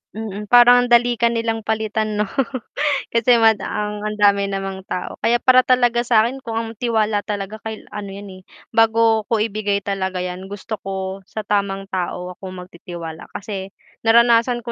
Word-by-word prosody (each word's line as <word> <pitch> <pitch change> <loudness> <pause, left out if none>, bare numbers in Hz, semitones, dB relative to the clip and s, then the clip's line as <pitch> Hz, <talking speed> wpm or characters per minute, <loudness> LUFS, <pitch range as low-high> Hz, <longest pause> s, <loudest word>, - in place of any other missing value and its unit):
Mm, 210 -1 -6
parang 245 +1 +7
ang - - -12
dali 240 0 +4
ka 235 - +4
nilang 230 -1 -2
palitan 220 -1 -1
'no. 210 - +1 0.9
Kasi 235 +1 +4
mada 220 -1 +3
ang 210 0 -3
ang 215 - -3
dami 200 -1 +3
namang 195 -1 -5
tao 180 - -5
kaya 235 - +2
para 255 -1 +5
talaga 245 -2 +3
sa'kin 235 +2 +2
kung 230 -4 -6
ang 225 0 -2
tiwala 220 -3 +1
talaga 205 +1 -4
kay 220 -1 -7
L - - -23
ano 205 -1 -6
'yan, 200 +1 -9
eh, - - -18 0.3
bago 225 -1 +3
ko 220 -2 +1
ibigay 205 -2 -1
talaga 190 -2 -2
'yan 180 +1 -6
gusto 205 +2 -6
ko 190 0 -5
sa 215 - -6
tamang 200 -1 -2
tao 180 -1 -3
ako 180 - -16
magtitiwala 170 -2 -9
kasi 195 -2 -5 0.4
naranasan 235 +1 +4
ko 235 - -5
215 Hz, 175 wpm, -20 LUFS, 195-230 Hz, 0.9 s, parang